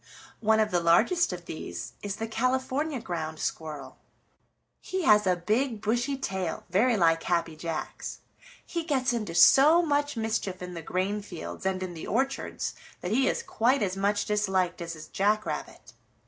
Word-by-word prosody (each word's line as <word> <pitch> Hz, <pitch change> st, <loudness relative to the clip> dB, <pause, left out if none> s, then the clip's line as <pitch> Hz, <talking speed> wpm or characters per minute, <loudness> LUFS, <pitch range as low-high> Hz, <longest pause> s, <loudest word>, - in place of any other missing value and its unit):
One 220 Hz, 0 st, +3 dB
of 215 Hz, -1 st, +2 dB
the 175 Hz, -, +3 dB
largest 175 Hz, -, +3 dB
of 175 Hz, -1 st, -7 dB
these 85 Hz, -, -6 dB
is 205 Hz, -1 st, -3 dB
the 225 Hz, -, -4 dB
California 260 Hz, +5 st, 0 dB
Ground 160 Hz, -5 st, -4 dB
Squirrel. 155 Hz, -3 st, -5 dB, 0.8 s
He 375 Hz, -1 st, -3 dB
has 210 Hz, -6 st, +5 dB
a 180 Hz, -, +4 dB
big, 220 Hz, +7 st, 0 dB
bushy 240 Hz, +6 st, 0 dB
tail, 190 Hz, -9 st, -3 dB
very 225 Hz, +5 st, +3 dB
like 165 Hz, -3 st, +3 dB
Happy 170 Hz, -2 st, 0 dB
Jack's. 165 Hz, 0 st, -5 dB, 0.5 s
He 335 Hz, -1 st, -3 dB
gets 265 Hz, -6 st, +1 dB
into 215 Hz, -8 st, -3 dB
so 295 Hz, -, +7 dB
much 290 Hz, -3 st, 0 dB
mischief 220 Hz, -4 st, -2 dB
in 180 Hz, 0 st, -7 dB
the 170 Hz, -, -6 dB
grain 190 Hz, +5 st, -1 dB
fields 190 Hz, 0 st, -6 dB
and 185 Hz, -1 st, -1 dB
in 180 Hz, -1 st, -5 dB
the 160 Hz, -, -7 dB
orchards 270 Hz, +1 st, -1 dB, 0.3 s
that 180 Hz, -, -3 dB
he 260 Hz, +4 st, +3 dB
is -, -, -2 dB
quite 245 Hz, +3 st, +2 dB
as 190 Hz, -2 st, -1 dB
much 205 Hz, +1 st, +1 dB
disliked 190 Hz, -4 st, 0 dB
as 165 Hz, -1 st, -5 dB
is 155 Hz, 0 st, -10 dB
Jack 210 Hz, +2 st, +1 dB
Rabbit. -, -, -6 dB
205 Hz, 170 wpm, -28 LUFS, 175-255 Hz, 0.8 s, so